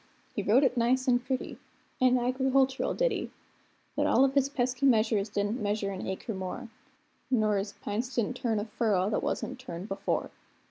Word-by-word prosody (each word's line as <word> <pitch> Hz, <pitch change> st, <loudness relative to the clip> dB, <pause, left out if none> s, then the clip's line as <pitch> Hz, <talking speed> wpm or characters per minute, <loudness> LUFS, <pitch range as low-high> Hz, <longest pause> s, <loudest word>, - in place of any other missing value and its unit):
He -, -, 0 dB
wrote 220 Hz, +8 st, +4 dB
it 260 Hz, -2 st, +2 dB
nice 255 Hz, +2 st, +2 dB
and 245 Hz, -1 st, +3 dB
pretty 255 Hz, 0 st, -3 dB, 0.4 s
an 255 Hz, 0 st, +5 dB
agricultural 265 Hz, +2 st, +1 dB
ditty; -, -, 0 dB, 0.7 s
But -, -, +1 dB
all 270 Hz, -, +5 dB
o' -, -, +3 dB
his 275 Hz, 0 st, +2 dB
pesky 255 Hz, 0 st, +1 dB
measures 220 Hz, -4 st, +3 dB
didn't 205 Hz, +4 st, -1 dB
measure 205 Hz, -1 st, -1 dB
an 190 Hz, -, -5 dB
acre 190 Hz, +4 st, -4 dB
more, 190 Hz, +5 st, -5 dB, 0.6 s
Nor 215 Hz, -5 st, +2 dB
his 200 Hz, +1 st, -3 dB
p'ints 235 Hz, +5 st, -2 dB
didn't 240 Hz, +1 st, 0 dB
turn 225 Hz, -4 st, 0 dB
a 205 Hz, -, -3 dB
furrow 210 Hz, -4 st, +1 dB
that -, -, 0 dB
wasn't 260 Hz, 0 st, -3 dB
turned 185 Hz, -7 st, -7 dB
before. 195 Hz, +1 st, -2 dB
240 Hz, 175 wpm, -29 LUFS, 205-260 Hz, 0.7 s, an